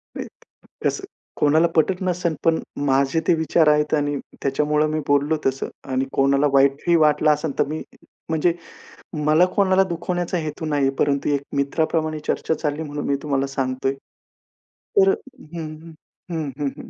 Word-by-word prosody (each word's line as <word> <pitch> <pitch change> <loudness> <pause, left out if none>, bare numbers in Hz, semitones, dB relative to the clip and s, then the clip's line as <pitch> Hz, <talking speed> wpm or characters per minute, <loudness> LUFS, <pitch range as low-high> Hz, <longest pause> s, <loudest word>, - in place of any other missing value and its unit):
नाही, - - -5 0.6
कसं 390 - 0 0.3
कोणाला 155 +3 +4
पटत 180 +4 +2
नसेल, 180 -3 -1
पण 165 -1 +3 0.3
माझे 135 +2 +2
ते - - +5
विचार 160 0 +2
आहेत 150 0 +2
आणि 145 -1 0 0.3
त्याच्यामुळं 150 +2 +1
मी 155 - -1
बोललो 145 +2 +2
तसं. 135 0 -1 0.2
आणि 130 +1 +1
कोणाला 140 +1 +3
वाईटही 140 +5 +3
वाटलं 155 -1 +4
असेल 150 -1 -2
तर - - +4
मी 155 +2 -4 0.5
म्हणजे 160 +2 +2 0.7
मला 155 +4 +5
कोणाला 190 -1 +4
दुखवण्याचा 175 +1 -2
हेतू 160 0 -4
नाही 145 -2 0
आहे. 135 - -2
परंतु 140 0 +1
एक 140 -1 +1 0.2
मित्राप्रमाणे 155 +2 0
चर्चा - - 0
चालली 155 0 -2
म्हणून 145 -1 -5
मी 140 - +2
तुम्हाला 140 -2 0
सांगतोय. 135 0 -1 1.0
तर 390 -1 +6
हं, 170 - -7
हं. 165 - -11 0.4
हं, 160 -3 -2
हं, 145 -1 0
हं. - - -10
150 Hz, 155 wpm, -22 LUFS, 140-165 Hz, 1.0 s, तर